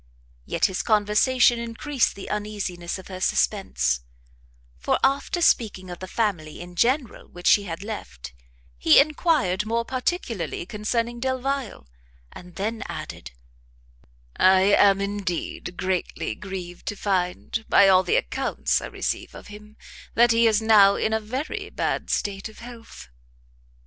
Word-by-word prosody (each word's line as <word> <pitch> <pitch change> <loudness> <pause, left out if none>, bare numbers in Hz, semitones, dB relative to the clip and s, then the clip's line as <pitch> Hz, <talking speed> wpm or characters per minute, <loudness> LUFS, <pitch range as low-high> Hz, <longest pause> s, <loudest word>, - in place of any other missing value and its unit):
Yet - - +1
his 190 - -1
conversation 235 +3 +3
encreased 235 +4 -1
the 200 - -9
uneasiness 205 -5 -4
of 190 - -11
her 185 -1 -8
suspence; 70 - +1 0.8
for 65 - +1
after 280 +7 +1
speaking 185 - +1
of 175 - -8
the 185 - -7
family 185 -9 -2
in 175 0 -9
general 250 - 0
which 175 0 -13
she 205 - +5
had 170 +1 -6
left, 70 - -8 0.5
he 155 - +6
enquired 285 - +2
more 230 +2 -1
particularly 245 - -3
concerning 230 +4 -2
Delvile, 260 - -3 0.4
and 180 -1 -13
then 220 +3 -3
added, - - -7 1.1
"I 190 +2 +5
am, 195 -1 +5
indeed, 195 -3 -4
greatly 185 -1 -2
grieved 185 -3 -8
to 205 - -2
find, 190 +2 -2
by 200 - +6
all 185 -1 +6
the 315 - 0
accounts - - 0
I - - -5
receive - - -4
of - - -11
him, 210 +1 -13 0.4
that 240 +1 +5
he 230 0 +4
is 220 0 +2
now 205 -3 +6
in 220 - -1
a 220 - +2
very 255 +8 -5
bad - - -2
state 200 +1 -2
of 215 - -16
health." 235 - -11
210 Hz, 140 wpm, -24 LUFS, 185-235 Hz, 1.1 s, he